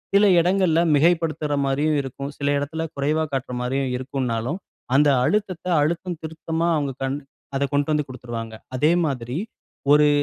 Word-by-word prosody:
சில 200 +1 +6
இடங்கள்ல 180 -2 +3 0.2
மிகைப்படுத்துற 160 -1 +2
மாரியும் 145 +3 +1
இருக்கும். 140 +1 -6
சில 140 - -1
இடத்தில 155 +3 -3
குறைவா 150 +3 +1
காட்டுற 130 -1 -2
மாரியும் 130 +1 -1
இருக்கும்னாலும், 130 - -2 0.4
அந்த 145 +1 +5
அழுத்தத்த, 195 +1 0 0.2
அழுத்தம் 170 +2 -1
திருத்தமா 160 +1 -2
அவங்க 145 -3 0
கண் 135 +1 -1 0.4
அதக் 140 0 0
கொண்டு 145 0 +2
வந்து 150 -1 +1
குடுத்துருவாங்க. 115 -3 -6 0.2
அதே 150 +5 +4
மாதிரி 125 -2 -3 0.6
ஒரு 150 0 +6
145 Hz, 140 wpm, -23 LUFS, 135-160 Hz, 0.6 s, சில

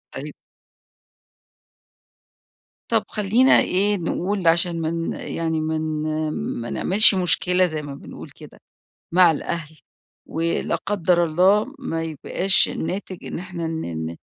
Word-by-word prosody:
أيوه. - - -7 2.6
طب - - +2
خلّينا 220 +5 +3
إيه 200 +3 +1
نقول، 185 +2 -2
عشان 170 0 +2
ما 160 - -1
ن 165 0 -3
يعني 160 -1 -3
ما 160 0 -2
ن 155 0 -2 0.3
ما 120 - -6
نعملش 205 +2 +5
مشكلة، 180 0 +2
زي 155 -3 -4
ما 145 -1 -8
بنقول - - -11
كده - - -15 0.5
مع 180 -2 +6
الأهل، 160 0 -5 0.5
ولا 165 +1 -1
قدّر 180 -3 0
الله 195 - +2
ما 165 -11 -4
يبقاش 165 +5 +3
الناتج 185 +1 -5
إن - - -5
إحنا 180 -2 -6
ن 85 - -4
ن - - -10
170 Hz, 125 wpm, -22 LUFS, 160-185 Hz, 2.6 s, مع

